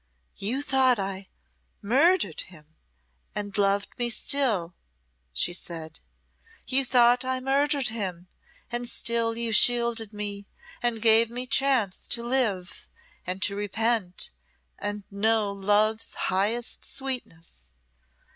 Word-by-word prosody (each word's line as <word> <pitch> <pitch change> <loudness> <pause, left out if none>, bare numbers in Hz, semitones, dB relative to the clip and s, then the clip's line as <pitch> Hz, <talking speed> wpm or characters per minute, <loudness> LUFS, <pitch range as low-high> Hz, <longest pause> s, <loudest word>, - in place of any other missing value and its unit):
"You 245 +8 -2
thought 260 -3 +3
I 195 -1 -4 0.5
murdered 265 - +2
him, 155 -3 -17 0.6
and 205 -1 -4
loved 200 0 +2
me 240 0 0
still," 225 -9 +1 0.6
she 65 - -1
said. 165 -3 -5 0.7
"You 270 +1 +2
thought 245 0 +4
I 260 0 -1
murdered 275 0 +1
him, 185 -5 -5 0.4
and 240 0 -2
still 230 -1 +1
you 235 -1 0
shielded 235 -2 +3
me, 205 -1 -5 0.3
and 235 -2 -1
gave 225 0 +5
me 245 +2 -4
chance 255 -7 +1
to 235 - -1
live, 230 -8 -1 0.4
and 185 +2 -1
to 200 - +3
repent, 205 -1 -1 0.5
and 205 0 -3
know 215 +1 +1
love's 210 +3 +1
highest 215 +6 -1
sweetness. 165 - -4
220 Hz, 115 wpm, -26 LUFS, 195-245 Hz, 0.7 s, gave